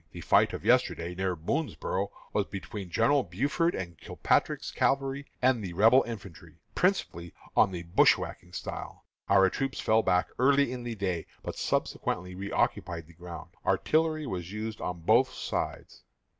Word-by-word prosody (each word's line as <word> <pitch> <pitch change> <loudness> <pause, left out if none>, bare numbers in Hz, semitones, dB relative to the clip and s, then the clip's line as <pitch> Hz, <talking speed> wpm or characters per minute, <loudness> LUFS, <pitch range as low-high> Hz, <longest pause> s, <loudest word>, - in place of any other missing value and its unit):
The - - -7
fight - - +4
of - - -6
yesterday, 85 +1 +2
near 95 0 -1
Boonsboro', 100 - -2 0.2
was 100 - +1
between 100 -1 -7
Generals 120 +6 +2
Buford 145 - 0
and 85 -4 -6
Kilpatrick's - - 0
cavalry 135 +1 0 0.2
and 125 -4 +3
Rebel 115 +6 +7
infantry, 100 -7 -9 0.2
principally 85 0 0 0.2
on - - +5
the 85 -2 -5
bushwhacking 90 +1 +2
style. - - -6 0.2
Our 95 -1 +6
troops 135 -1 -2
fell 110 +1 +3
back 90 -4 +2
early 140 0 +4
in 125 -1 -5
the 120 -1 -4
day, 95 -5 -2 0.2
but - - -5
subsequently 90 0 -2
reoccupied 90 -3 -1
the 85 - -17
ground. 85 0 -9
Artillery 155 -1 +1
was 90 -7 -5
used 110 +1 -5
on 90 -1 -4
both - - +4
sides. - - -4
100 Hz, 145 wpm, -29 LUFS, 90-130 Hz, 0.2 s, Rebel